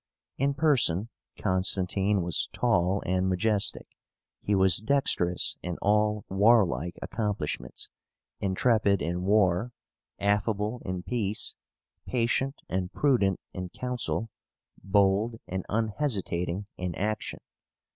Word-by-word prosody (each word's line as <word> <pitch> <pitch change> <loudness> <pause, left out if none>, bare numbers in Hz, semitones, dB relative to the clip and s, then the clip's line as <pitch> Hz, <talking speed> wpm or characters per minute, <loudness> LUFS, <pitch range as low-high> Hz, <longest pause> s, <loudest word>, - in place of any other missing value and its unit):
In 140 +1 +1
person 120 - +2 0.3
Constantine 95 +1 +1
was 85 0 -1
tall 100 -5 +1
and 95 +1 +1
majestic: 100 +2 0 0.6
he 105 - +1
was 95 -2 +4
dexterous 110 -7 +1
in 90 -1 -4
all 105 0 +2
warlike 95 - +3
accomplishments; 100 - -3 0.5
intrepid 100 0 +2
in 90 +1 -2
war, 100 +3 +2 0.4
affable 105 +3 0
in 95 -1 -4
peace; 110 -3 +1 0.5
patient 130 +3 0
and 90 -1 -2
prudent 115 -10 +2
in 90 -1 -5
council, 125 -2 -3 0.5
bold 100 +3 +2
and 95 0 -4
unhesitating 105 - -1
in 90 -2 -3
action. 105 0 -3
100 Hz, 100 wpm, -28 LUFS, 95-115 Hz, 0.6 s, was